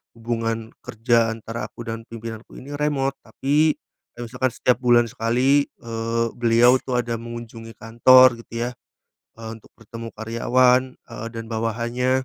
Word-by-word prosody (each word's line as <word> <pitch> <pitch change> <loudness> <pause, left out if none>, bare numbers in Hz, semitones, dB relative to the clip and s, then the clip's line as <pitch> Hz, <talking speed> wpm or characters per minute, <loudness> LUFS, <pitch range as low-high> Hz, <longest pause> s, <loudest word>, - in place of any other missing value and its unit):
hubungan 115 -1 -3
kerja 115 0 +1
antara 115 +1 -6
aku 120 - -10
dan 115 0 -4
pimpinanku 115 0 -9
ini 140 +3 -9
remote, 140 -2 0
tapi, 145 +6 +1 0.4
kayak 120 - -7
misalkan 125 +1 -1
setiap 125 - +2
bulan 120 -1 +5
sekali, 130 +4 +2
eee, 115 0 -3
beliau 120 +2 +5
tuh, 125 -1 -2
ada 120 -1 -3
mengunjungi 115 -1 -9
kantor, 120 +2 +6
gitu 115 0 -4
ya, - - -8 0.7
eee, 110 - -6
untuk 110 - -19
bertemu 115 0 -9
karyawan, 125 +3 +3 0.2
eee, 115 -1 -9
dan 115 - -5
bawahannya. 120 +3 -1
115 Hz, 140 wpm, -22 LUFS, 115-125 Hz, 0.7 s, kantor